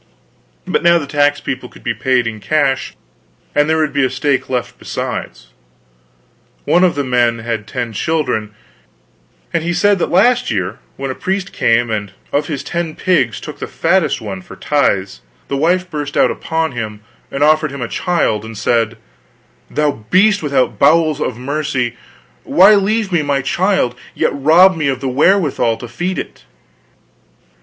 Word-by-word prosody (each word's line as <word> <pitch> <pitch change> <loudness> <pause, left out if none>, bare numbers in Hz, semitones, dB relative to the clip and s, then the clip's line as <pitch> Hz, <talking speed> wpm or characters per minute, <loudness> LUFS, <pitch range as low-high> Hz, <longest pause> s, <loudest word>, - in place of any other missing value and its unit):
But - - 0
now 170 0 +5
the 155 - -3
tax 145 0 +1
people - - -5
could - - -17
be - - -1
paid 130 -2 +1
in 110 -1 -4
cash, 135 - 0 0.6
and 145 +1 +2
there 160 - +2
would 155 -3 0
be 140 -1 +2
a 130 - +2
stake 130 +1 -1
left 125 -2 -3
besides. - - -5 1.2
One 180 - +3
of 180 - +3
the 145 - -1
men 120 -2 +2
had 115 -2 -4
ten 120 -2 -4
children; 125 -6 -1 1.0
and 170 - 0
he 175 +1 -1
said 200 +2 +3
that - - 0
last 240 +7 +3
year 95 0 -2 0.2
when 135 -1 -3
a - - -3
priest 190 +5 -3
came 115 0 +2
and 105 -3 -3 0.2
of 145 +1 0
his 145 -4 -4
ten 170 -2 -3
pigs 185 -1 +1
took - - -9
the - - -4
fattest 185 -6 +1
one 100 -4 -6
for - - -12
tithes, 100 - 0 0.3
the 140 - -1
wife 180 +6 +1
burst 150 -4 -4
out - - +4
upon 160 -1 -2
him, 110 -4 -5 0.3
and 140 +1 -1
offered 155 0 +3
him 140 -2 -5
a - - -3
child 115 - 0
and 110 -1 -9
said: 115 0 0 0.7
"Thou 145 -7 -1
beast 205 - +4
without 140 -4 0
bowels 155 -3 +3
of 120 - -2
mercy, 130 -2 -2 0.5
why 195 +4 +6
leave 210 +1 +1
me 170 -3 +2
my 140 -2 0
child, 185 -4 +1 0.2
yet - - +1
rob 165 +7 +5
me 155 -3 -1
of 135 -2 -1
the 135 - -3
wherewithal 140 - +2
to 120 - -8
feed 175 +10 -3
it?" - - -7
145 Hz, 170 wpm, -16 LUFS, 120-170 Hz, 1.2 s, why